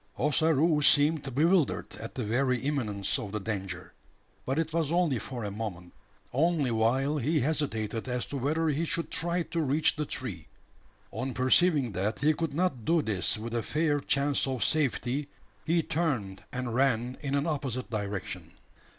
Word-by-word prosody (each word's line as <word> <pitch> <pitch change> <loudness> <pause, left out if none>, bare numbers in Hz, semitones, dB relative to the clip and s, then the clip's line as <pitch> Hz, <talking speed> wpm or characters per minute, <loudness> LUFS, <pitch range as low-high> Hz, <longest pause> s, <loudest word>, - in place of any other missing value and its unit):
Ossaroo 150 +2 +3
seemed 145 -2 +3
bewildered 165 +2 +2
at - - -8
the 125 - -2
very 125 +3 +1
imminence 115 -9 0
of 100 - -6
the 105 - -2
danger. 95 -4 -5 0.5
But 135 +2 0
it 160 -1 -1
was 165 -3 0
only 170 -8 +2
for 120 +2 -6
a 100 - -3
moment 100 -5 -6 0.4
only 150 -2 +2
while 130 +6 +2
he 150 +5 +1
hesitated 120 -6 -1
as 125 -1 -1
to 140 - -5
whether 155 +5 0
he 150 +2 0
should 170 0 -1
try 170 +1 +1
to 165 0 -2
reach 150 +2 +2
the 150 -1 -3
tree. 95 -11 -4 0.6
On 130 +4 -3
perceiving 130 0 +3
that 100 +4 -1
he 150 +3 +3
could 160 -2 -3
not 160 -9 0
do 165 +4 +2
this 105 -3 +1
with 115 +2 -6
a 120 - 0
fair 150 - +1
chance 140 0 +1
of 130 -3 -1
safety, 140 -1 0 0.4
he 165 +1 +2
turned 130 - -1
and 125 -2 -3
ran 125 -1 +1
in 140 -2 -1
an 140 +1 +1
opposite 135 -6 -3
direction. 100 -3 -4
135 Hz, 165 wpm, -29 LUFS, 115-155 Hz, 0.6 s, Ossaroo